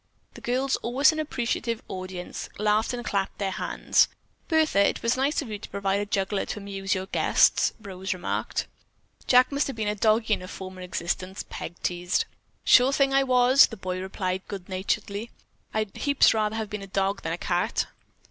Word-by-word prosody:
The - - -12
girls, 260 +3 0
always 265 +5 +3
an 315 - -4
appreciative 235 -5 -2
audience, 185 -1 -6
laughed 210 +1 +2
and 240 -1 -5
clapped 195 -2 -1
their 195 -2 -1
hands. - - +2 0.4
"Bertha, 315 - +3
it - - 0
was 230 +2 +2
nice 280 +4 +1
of 250 - -9
you 210 -1 -5
to - - -9
provide 195 0 0
a 205 - -3
juggler 195 0 0
to - - -5
amuse 195 -1 -2
your 190 0 -3
guests," - - +3
Rose 190 -3 -5
remarked. 185 -1 -2 0.6
"Jack 250 +1 +6
must 280 +1 +1
have 275 - -5
been 220 -2 -2
a 210 - +1
doggie 215 +1 +2
in - - -1
a 185 - -8
former 185 0 -8
existence," 180 +1 -3
Peg 170 - -6
teased. 175 0 0 0.4
"Sure 255 +2 +6
thing 275 -1 +2
I 275 - +5
was!" 255 +1 +6
the 225 - -9
boy 185 -1 -4
replied 190 -1 -2
good 195 -3 -7
naturedly. 200 +3 -2 0.4
"I'd 215 -2 -2
heaps 280 -1 +4
rather 215 -1 0
have 220 -2 -4
been 210 -1 -4
a 195 - -8
dog 195 +1 -1
than 165 - -2
a - - -3
cat." 175 0 0
205 Hz, 190 wpm, -26 LUFS, 190-245 Hz, 0.6 s, Jack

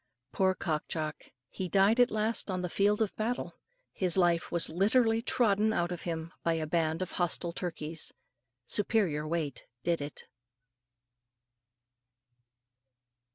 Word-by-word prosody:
Poor 190 -1 +2
Cock 155 -5 -2
Jock! 155 -2 -4 0.3
he 185 -1 -4
died 200 +5 +4
at 245 0 +6
last 215 0 -1
on 185 -1 -1
the 180 - -3
field 205 +2 +3
of 210 - -4
battle. 235 +4 -2 0.4
His 185 -2 0
life 175 -2 +2
was 170 -1 0
literally 225 +6 +3
trodden 220 -3 +3
out 175 -3 0
of 175 - -4
him 165 0 -4
by 165 - +1
a 160 -1 -1
band 160 +2 0
of 185 - -7
hostile 175 -1 -1
turkeys. 165 -3 -3 0.5
Superior 190 -8 +1
weight 155 -4 -3 0.2
did 170 -1 +1
it. 145 0 -6
180 Hz, 135 wpm, -31 LUFS, 165-210 Hz, 0.5 s, at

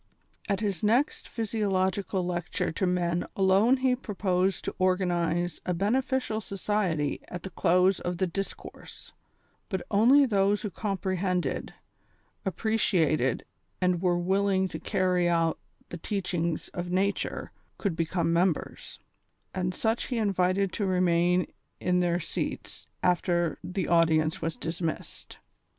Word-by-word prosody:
At 200 0 0
his 200 -6 -1
next 240 +8 +1
physiological 195 -4 -1
lecture 175 -1 -2
to 185 +3 -1
men 175 -1 0
alone 195 +7 +4
he 255 -1 +2
pro 225 -5 -7
posed 185 0 +1
to - - -2
organize 175 -2 +1
a 180 - -1
beneficial 230 +3 0
society 195 -7 -1
at 175 -2 -7
the 190 - -6
close 180 +2 +3
of 175 0 -3
the 190 - +1
discourse; 195 +3 -7 0.6
but 190 -3 -2
only 250 +8 +6
those 200 -3 +2
who 210 - -3
comprehended, 185 -1 -2 0.7
appreciated 180 - +1 0.3
and 180 -2 +1
were 180 -2 +2
willing 190 +1 +1
to 160 - -6
carry 180 +1 +1
out 165 -1 +1 0.3
the 175 - -6
teachings 175 -3 -2
of 175 0 -5
nature 195 +3 -1 0.3
could 195 -6 -1
become 165 0 0
members, 175 -1 -1 0.5
and 180 -1 -1
such 225 +5 -1
he 250 - -2
invited 195 -2 +1
to 205 - -1
remain 180 -1 +3 0.3
in 180 0 +1
their 175 -1 +1
seats 160 - -5 0.2
after 175 -2 +1
the 180 -2 -3
audience 160 -2 +3
was 165 0 -2
dismissed. 165 0 -5
185 Hz, 130 wpm, -28 LUFS, 175-200 Hz, 0.7 s, only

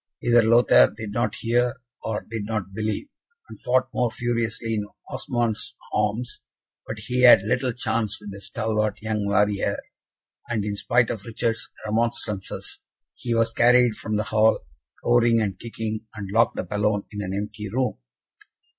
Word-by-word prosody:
Either 120 0 +5
Lothaire 115 +2 +6
did 110 -3 -5
not 120 +3 -1
hear, 120 +2 +1 0.2
or 110 -2 -2
did 110 -1 -5
not 105 -3 -3
believe, 110 - -2 0.4
and - - -12
fought 130 +1 +2
more 125 -1 +1
furiously 115 -1 -2
in 105 -1 -2 0.2
Osmond's 120 -3 -2 0.2
arms, 105 +4 -1 0.5
but 110 - -5
he 125 +4 -1
had 120 -6 +8
little 125 +4 0
chance 115 -3 -1
with 105 -1 -9
the 100 0 -9
stalwart 110 -1 -1
young 110 -2 -1
warrior, 105 0 +2 0.7
and, 110 -4 -1
in 105 -1 -2
spite 120 +3 +2
of 105 -4 -5
Richard's 115 0 -2 0.2
remonstrances, 110 -3 -2 0.3
he 120 -1 -3
was 115 0 +2
carried 120 -1 +5
from 110 0 -3
the 105 - +1
hall, 110 - +2 0.4
roaring 120 -1 +4
and 100 -4 -2
kicking, 110 -1 -5
and 100 -2 -6
locked 115 +2 +3
up - - -4
alone 105 0 +1
in 105 -1 -5
an 95 -1 -3
empty 105 +1 -4
room. 125 +4 -1
110 Hz, 155 wpm, -24 LUFS, 105-120 Hz, 0.7 s, had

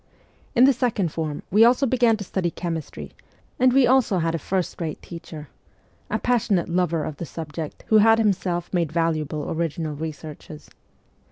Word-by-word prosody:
In 245 - +6
the 270 +1 +6
second 220 - -1
form 155 -2 -4
we 210 +4 +6
also 250 +4 +4
began 240 -3 +3
to 205 - -6
study 180 -2 -2
chemistry, 160 - -6 0.5
and 255 0 +5
we 265 0 +5
also 250 -6 +3
had 165 -1 0
a 165 - -2
first 185 +3 -3
rate 160 -2 -4
teacher 160 -3 -10 0.6
a - - 0
passionate 210 -8 +1
lover 170 -2 0
of 150 - -5
the 170 - -5
subject 155 -1 -7
who 220 - +6
had 225 +1 +6
himself 190 -5 -1
made 170 -4 0
valuable 155 -3 -1
original 160 -1 -2
researches. 155 0 -8
175 Hz, 165 wpm, -23 LUFS, 160-220 Hz, 0.6 s, In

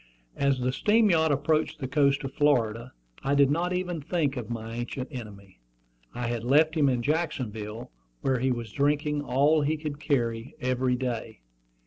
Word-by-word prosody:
As 140 -2 +1
the 125 0 0
steam 215 - +3
yacht 160 -2 +3
approached 155 +3 +1
the 135 -4 -4
coast 140 0 +2
of 135 0 -5
Florida 120 -5 +1 0.3
I 140 +1 +1
did 140 -1 +5
not 175 +4 0
even 180 -3 -2
think 150 -2 -1
of 120 -4 -5
my 115 -1 -5
ancient 120 +2 -4
enemy. 100 - -10 0.5
I 120 0 -4
had 120 -1 -2
left 150 +6 +4
him 145 -3 +3
in 125 -2 0
Jacksonville, 120 -8 -3 0.3
where 130 -2 +1
he 130 +1 +1
was 120 -3 -4
drinking 145 +2 +1
all 145 +3 +3
he 155 +2 0
could 150 -2 -5
carry, 120 -5 -1
every 125 0 0
day. 120 - -4
135 Hz, 170 wpm, -27 LUFS, 120-150 Hz, 0.5 s, did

